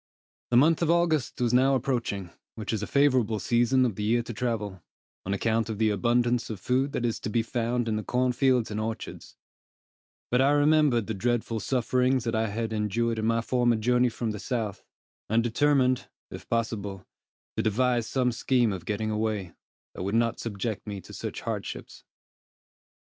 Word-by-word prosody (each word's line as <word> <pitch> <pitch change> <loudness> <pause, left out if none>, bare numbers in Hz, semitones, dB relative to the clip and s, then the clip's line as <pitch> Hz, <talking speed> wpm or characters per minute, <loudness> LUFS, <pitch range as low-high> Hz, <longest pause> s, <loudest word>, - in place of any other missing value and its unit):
The 120 - +4
month 160 +6 +4
of 165 - +1
August 165 -5 +1
was 120 -1 +1
now 135 +2 +4
approaching, 115 -8 -2 0.2
which 110 -1 -4
is 110 - -1
a 105 - -3
favorable 130 -6 +3
season 120 +4 +2
of 120 - 0
the 105 - -6
year 115 +3 +2
to 120 - -7
travel, 105 -5 -3 0.5
on - - -1
account 115 +2 0
of 110 - -3
the 110 0 +2
abundance 120 +3 +1
of 110 -4 -5
food 130 +7 0
that 120 - -1
is 115 - -1
to - - -4
be 115 +1 +1
found 120 +1 -1
in 110 -1 0
the 110 - -3
corn 125 +2 +1
fields 125 -3 +2
and 105 - -2
orchards; 110 +1 -6 0.9
but 125 +1 +4
I 140 +2 +4
remembered 145 -5 +3
the 110 - -3
dreadful 115 +2 -1
sufferings 125 +2 +1
that 115 -1 -2
I 110 0 +1
had 110 +2 -3
endured 110 +2 0
in 110 - 0
my 115 0 +2
former 120 0 +2
journey 125 +3 +2
from 115 -1 -3
the 105 - -6
South, 110 -5 -3 0.5
and 115 +2 +3
determined, 130 +1 +2 0.2
if - - -10
possible, 105 -4 -2 0.5
to - - 0
devise 120 +2 +1
some 125 -2 +1
scheme 120 -2 +1
of 90 -3 -7
getting 110 +2 -2
away, 105 -4 -2 0.4
that - - -7
would 100 +4 -1
not 115 0 +1
subject 110 -1 -4
me 100 -1 -4
to - - -13
such - - -5
hardships. - - -6
115 Hz, 185 wpm, -27 LUFS, 110-125 Hz, 0.9 s, The